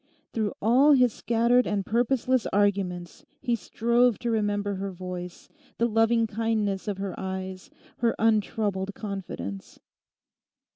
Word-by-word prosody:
Through 215 -3 -1
all 260 +7 +6
his 250 -4 +4
scattered 235 +2 +2
and 200 -2 -1
purposeless 245 +1 +1
arguments 190 -4 0 0.2
he 245 -3 0
strove 235 +3 +2
to 240 -1 -2
remember 205 -2 0
her 195 0 -4
voice, 180 -1 -7 0.3
the 235 - +2
loving 225 +1 +3
kindness 215 -2 -1
of 205 -2 -2
her 195 -1 -4
eyes, 190 0 -5 0.3
her 235 -1 +1
untroubled 210 -3 0
confidence. 175 - -6
210 Hz, 125 wpm, -26 LUFS, 190-235 Hz, 0.3 s, all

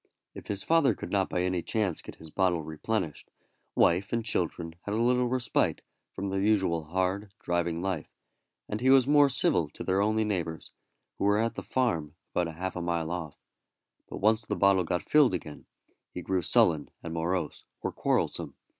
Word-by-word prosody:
If - - -10
his 100 -1 -3
father 160 -9 +3
could 85 - -7
not 95 -2 +1
by 90 - 0
any 90 -1 0
chance 100 -3 -1
get - - -10
his 80 -1 -12
bottle 90 -3 +1
replenished, 80 +2 -3 0.5
wife 90 +4 +3
and 115 -1 -1
children 85 -5 -1
had 105 +3 -3
a - - 0
little 125 +2 +3
respite 125 0 0 0.3
from 100 0 -4
their 95 0 0
usual 95 -6 +2
hard, 95 +4 -1
driving 85 -1 -1
life, 95 -4 -2 0.6
and 105 +2 -4
he 130 - +3
was 135 -2 +7
more 145 0 +5
civil 100 - +1
to - - -8
their 95 +1 +1
only 110 +1 +2
neighbours, 85 -6 -3 0.5
who - - 0
were 100 +1 +4
at 115 +1 +1
the - - -5
farm 85 - -1 0.2
about 85 -2 0
half 95 +2 -4
a 90 - -3
mile 85 -1 -1
off; 85 -5 -5 0.7
but - - -6
once 110 +2 +2
the - - -3
bottle 100 -2 +4
got 90 +2 -1
filled 145 -10 +4
again, 75 -4 -8 0.4
he 90 - -6
grew 95 0 0
sullen 80 -2 +3
and 85 - -5
morose, 85 -1 -2 0.2
or - - -2
quarrelsome. - - -1
95 Hz, 185 wpm, -29 LUFS, 85-110 Hz, 0.7 s, was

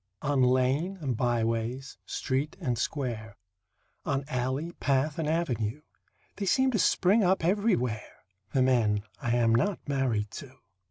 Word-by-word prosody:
On 140 -1 +2
lane 130 +9 +2
and 135 -7 -2
byways, 120 +2 -1
street 135 +3 -2
and 125 -2 -1
square, 115 -4 -3 0.7
On 140 0 -1
alley, 130 +5 -2
path 140 +3 +1
and 160 - -1
avenue, 145 -5 -1 0.5
They 200 - -3
seem 260 +5 +3
to 220 - 0
spring 195 +5 +3
up 185 -2 +2
everywhere 175 - 0 0.3
The 130 - +3
men 110 -5 +2 0.2
I 120 0 0
am 115 -2 +3
not 160 - 0
married 125 -7 0
to. 130 -2 -13
130 Hz, 140 wpm, -28 LUFS, 120-160 Hz, 0.7 s, seem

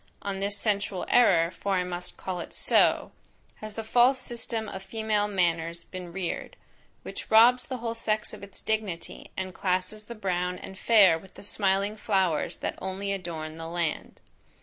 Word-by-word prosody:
On 195 -1 -3
this 200 +1 -1
sensual 200 -3 -1
error, 175 -9 +5
for 195 +2 -1
I 180 - +2
must 180 0 -5
call 185 -2 -4
it - - -7
so, - - +3 0.5
has 215 -1 -8
the 225 - -4
false 245 +4 +4
system 230 -2 -3
of 190 -2 -6
female 210 +1 0
manners 170 -3 0
been 180 -2 -8
reared, 180 -1 -4 0.5
which - - -7
robs 240 +3 +6
the 260 - -4
whole 230 -1 -3
sex 215 -1 -2
of - - -9
its 200 -1 -10
dignity, 215 -6 -3
and 185 -1 -3
classes 185 +4 -1
the 235 - -8
brown 180 -3 -1
and 190 - -9
fair 190 -6 +6
with 190 +3 -17
the - - -11
smiling 200 0 +1
flowers 190 -7 +1
that - - -4
only 190 +1 -3
adorn 165 -5 -4
the 165 - -5
land. 170 -1 -3
195 Hz, 170 wpm, -28 LUFS, 180-215 Hz, 0.5 s, robs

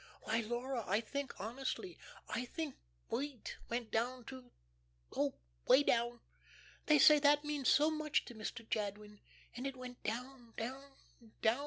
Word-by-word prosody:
Why, 225 +1 +1
Laura, 240 +2 -2
I 200 +3 +3
think, 280 +5 -4
honestly, 265 - -4 0.3
I 250 - -2
think 305 +2 -4 0.4
wheat 275 -3 -3
went 235 -1 -2
down 245 +2 0
to 255 -1 -9 0.7
oh, - - +1 0.3
way 285 - +7
down. 240 -2 +1 0.7
They 305 - +7
say 300 +1 +8
that 290 +1 +5
means 295 -3 +1
so 300 +2 +5
much 310 -1 +1
to - - -9
Mr. 220 +1 -6
Jadwin, 210 0 -3 0.4
and 250 +3 -3
it 270 - -4
went 250 -1 -8
down, 245 0 -5
down, 270 +4 -5 0.5
down. 225 +4 +4
250 Hz, 150 wpm, -36 LUFS, 230-280 Hz, 0.7 s, say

